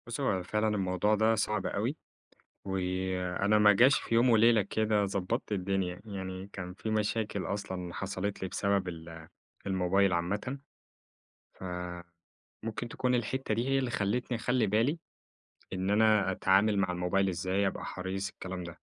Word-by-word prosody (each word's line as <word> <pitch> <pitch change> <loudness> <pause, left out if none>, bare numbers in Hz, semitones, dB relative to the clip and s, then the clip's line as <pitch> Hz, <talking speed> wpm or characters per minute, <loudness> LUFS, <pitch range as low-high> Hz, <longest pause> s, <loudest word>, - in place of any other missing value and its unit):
بُص، 120 +4 -4
هو 95 -9 +1
فعلًا 105 +4 0
الموضوع 100 0 +1
ده 110 +2 +3
صعب 105 -2 -1
أوي، 115 +9 -1 0.7
وأنا 95 +1 0
ما 105 -1 +7
جاش 125 +5 +5
في - - -3
يوم 120 +2 +5
وليلة 115 -1 +5
كده 105 +1 +1
ضبطت 100 +1 -2
الدنيا، 95 -2 -1
يعني 95 -2 -6
كان 90 -1 -6
في 110 - -5
مشاكل 110 -1 -1
أصلًا 95 -4 -4
حصلت 100 0 -3
لي 95 - -1
بسبب 100 -1 0
ال 80 -1 -9 0.4
الموبايل 95 0 +2
عامةً، 100 +10 -1 1.0
ف - - -13 1.0
ممكن 115 +2 -4
تكون 125 +1 0
الحتّه 120 0 -1
دي 115 +4 -1
هي 135 0 +3
اللي 130 -2 -1
خلتني 120 +4 -1
أخلي 125 -1 +1
بالي، 115 - +1 0.7
إن 95 +1 -1
أنا 105 -2 +4
أتعامل 100 +3 +3
مع 100 -2 +1
الموبايل 90 +2 +1
إزاي، 95 +3 0
أبقى - - -4
حريص 95 +1 -4
الكلام 95 -2 -6
ده. 85 -1 -9
100 Hz, 150 wpm, -30 LUFS, 95-110 Hz, 1.0 s, ما